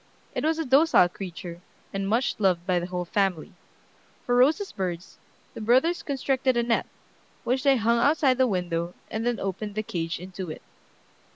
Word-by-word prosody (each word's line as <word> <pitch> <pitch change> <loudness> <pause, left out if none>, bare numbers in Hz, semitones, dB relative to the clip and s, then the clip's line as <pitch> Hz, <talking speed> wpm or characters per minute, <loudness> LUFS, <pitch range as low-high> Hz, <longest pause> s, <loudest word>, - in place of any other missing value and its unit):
It - - -2
was 320 +1 +1
a 325 - -2
docile 275 - +5
creature, 175 -1 -8 0.3
and 195 0 -2
much 235 +2 0
loved 180 -4 +2
by 180 -2 +2
the 175 - -4
whole 180 -1 -3
family. 190 -3 -1 0.7
For 245 - 0
Rosa's 305 +11 +3
birds, 180 -2 -5 0.3
the - - -8
brothers 260 +10 +3
constructed 265 -2 0
a 235 - +2
net, 235 0 0 0.6
which 255 +2 0
they 275 -1 +4
hung 235 +1 +2
outside 275 -1 +3
the 260 - +5
window, 175 -3 -2 0.2
and 225 +2 -2
then 240 -1 0
opened 200 +2 -4
the 215 - -1
cage 165 -5 -3
into 185 0 -7
it. 155 - -8
215 Hz, 175 wpm, -26 LUFS, 180-260 Hz, 0.7 s, docile